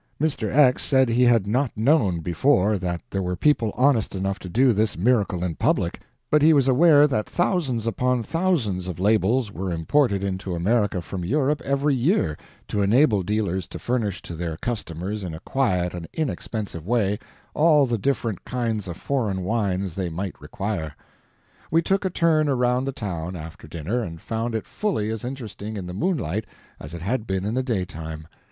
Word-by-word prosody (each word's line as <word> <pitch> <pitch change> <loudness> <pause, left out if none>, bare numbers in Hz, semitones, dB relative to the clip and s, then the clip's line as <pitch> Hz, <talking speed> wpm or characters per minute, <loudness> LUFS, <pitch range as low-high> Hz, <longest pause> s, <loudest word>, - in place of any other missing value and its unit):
Mr. 140 -8 -1
X 130 -3 +5
said 130 -3 +3
he 115 +2 +2
had 115 -4 +4
not 125 +4 0
known, 110 - +2
before, 100 - +2
that 85 -2 -3
there 95 - -1
were 90 -1 -2
people 115 - +2
honest 125 -6 +2
enough 95 +1 -2
to 90 - -8
do 125 +5 +4
this 110 0 0
miracle 100 -3 +1
in 90 -2 -1
public, - - 0 0.3
but 150 - +5
he 160 +2 +6
was 140 -3 +3
aware 145 +2 +6
that 110 -8 -1
thousands 155 - 0
upon 125 +1 0
thousands 130 - 0
of 90 -4 -5
labels 110 +3 +2
were 95 -2 -4
imported 100 - +1
into 95 -1 -3
America 100 0 +1
from 90 +2 -5
Europe 145 - +1
every 140 +1 +1
year, 130 - +1 0.3
to 105 - -1
enable 110 +1 +4
dealers 95 -2 -1
to - - -8
furnish 110 -6 -2
to - - -7
their 80 -1 -4
customers 100 -2 -4
in 85 -4 -5
a - - -8
quiet 90 -10 0
and 85 -2 -6
inexpensive 110 - -3
way 105 -4 +1 0.3
all 150 -2 +5
the 120 -3 -1
different 115 -5 -1
kinds 115 -5 -2
of 85 - -6
foreign 110 -9 -1
wines 95 -3 -1
they 90 -1 -2
might 90 +3 -4
require. 95 -7 -4 0.7
We 165 +2 +3
took 195 +3 +1
a - - +2
turn 160 -3 +2
around 125 -1 +1
the 135 - -1
town, 90 -7 -5
after 80 -1 -9
dinner, 85 +10 -2
and 85 -6 -6
found 115 +5 -3
it 110 - -2
fully 145 - -2
as 110 -2 -4
interesting 110 -4 -6
in 95 - -5
the 90 - -6
moonlight 110 - -1 0.3
as 75 +4 -8
it 85 - -7
had 115 +3 -1
been 95 0 -1
in 105 - -1
the 130 - +1
daytime. 85 - -4
110 Hz, 185 wpm, -24 LUFS, 90-130 Hz, 0.7 s, he